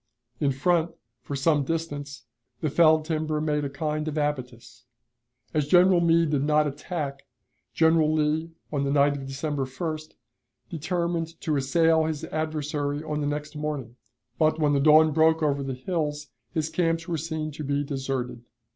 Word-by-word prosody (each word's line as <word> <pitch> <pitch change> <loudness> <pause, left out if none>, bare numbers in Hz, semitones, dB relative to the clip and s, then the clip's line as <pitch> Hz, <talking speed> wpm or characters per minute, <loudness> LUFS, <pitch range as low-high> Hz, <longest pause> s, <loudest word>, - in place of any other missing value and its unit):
In 140 -2 +2
front, 165 +5 +1 0.3
for 140 - -5
some 145 +1 +2
distance, 145 -3 -4 0.4
the 155 -4 -1
felled 160 -1 +5
timber 155 -1 -1
made 150 -1 0
a 140 - -2
kind 150 +2 -3
of 155 - -3
abatis. 125 -5 -4 0.7
As 150 -2 +1
General 180 +2 +5
Meade 165 -2 +3
did 140 -2 +1
not 150 +1 +3
attack, 140 -1 -5 0.4
General 160 -1 +3
Lee, 155 +1 0 0.2
on 140 -1 0
the 140 - 0
night 140 0 +3
of 135 -1 -6
December 140 0 -2
1st, 155 +4 -5 0.6
determined 170 0 -2
to 155 - 0
assail 160 +4 +3
his 155 -2 -3
adversary 150 -2 -2
on 150 -1 -3
the 145 - -1
next 150 +1 -4
morning; 150 -6 -4 0.4
but, 155 -1 +3
when 150 -2 +2
the 140 - +3
dawn 155 +2 +6
broke 160 +1 +3
over 140 -2 +1
the 135 -1 -3
hills, 150 0 -3 0.2
his 155 -1 -1
camps 165 -1 0
were 170 - -1
seen 155 0 -3
to 150 +1 -7
be 145 0 0
deserted. 135 -4 -4
150 Hz, 165 wpm, -26 LUFS, 140-160 Hz, 0.7 s, dawn